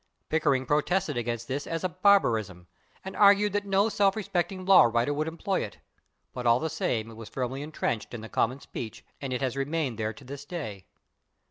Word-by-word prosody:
Pickering 140 Hz, -4 st, +2 dB
protested 150 Hz, +3 st, +1 dB
against 120 Hz, -1 st, -3 dB
this 140 Hz, +2 st, -3 dB
as 165 Hz, -1 st, -3 dB
a 185 Hz, -, +1 dB
barbarism, 115 Hz, -, +2 dB, 0.4 s
and 190 Hz, -, -6 dB
argued 205 Hz, 0 st, +5 dB
that 205 Hz, 0 st, -1 dB
no 195 Hz, +2 st, +3 dB
self 200 Hz, -3 st, +2 dB
respecting 185 Hz, -3 st, -2 dB
law 190 Hz, -8 st, +8 dB
writer 120 Hz, +4 st, +1 dB
would 155 Hz, +2 st, -1 dB
employ 170 Hz, +4 st, -1 dB
it, -, -, -8 dB, 0.6 s
but 125 Hz, -1 st, -3 dB
all 115 Hz, +1 st, +5 dB
the 160 Hz, +1 st, -2 dB
same 115 Hz, -3 st, -1 dB
it -, -, -11 dB
was 115 Hz, -1 st, -9 dB
firmly 130 Hz, +1 st, -3 dB
entrenched 145 Hz, -7 st, -3 dB
in 120 Hz, -, -6 dB
the 110 Hz, -, -7 dB
common 125 Hz, +4 st, 0 dB
speech 115 Hz, -5 st, -8 dB, 0.2 s
and 135 Hz, -2 st, -4 dB
it 125 Hz, -, -2 dB
has 130 Hz, -1 st, -1 dB
remained 140 Hz, -4 st, -2 dB
there 110 Hz, 0 st, -1 dB
to 110 Hz, -, -14 dB
this 140 Hz, +2 st, -8 dB
day. 125 Hz, -, -6 dB
140 Hz, 200 wpm, -28 LUFS, 120-185 Hz, 0.6 s, law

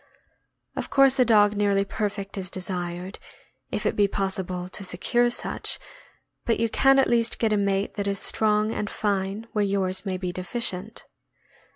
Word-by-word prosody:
Of -, -, -4 dB
course 270 Hz, 0 st, +4 dB
a 250 Hz, -, +6 dB
dog 210 Hz, -2 st, +4 dB
nearly 200 Hz, -1 st, +2 dB
perfect 200 Hz, -1 st, -4 dB
is 190 Hz, -2 st, -3 dB
desired, 180 Hz, 0 st, -4 dB, 0.5 s
if -, -, -3 dB
it -, -, +1 dB
be 205 Hz, -1 st, +4 dB
possible 190 Hz, -2 st, -3 dB
to 200 Hz, +2 st, -6 dB
secure 240 Hz, +7 st, +1 dB
such, 240 Hz, -, -1 dB, 0.7 s
but 230 Hz, -, 0 dB
you 230 Hz, 0 st, +1 dB
can 270 Hz, +4 st, +4 dB
at 270 Hz, -, +5 dB
least 230 Hz, -1 st, +2 dB
get 220 Hz, -2 st, +1 dB
a -, -, +2 dB
mate 200 Hz, 0 st, 0 dB
that 200 Hz, -1 st, -1 dB
is 200 Hz, 0 st, 0 dB
strong 215 Hz, +1 st, +1 dB
and 210 Hz, -, -3 dB
fine 200 Hz, +1 st, -2 dB
where 210 Hz, -, +1 dB
yours 195 Hz, -2 st, 0 dB
may 190 Hz, -2 st, -2 dB
be 180 Hz, -1 st, -3 dB
deficient. 185 Hz, +2 st, -2 dB
200 Hz, 170 wpm, -25 LUFS, 190-220 Hz, 0.7 s, a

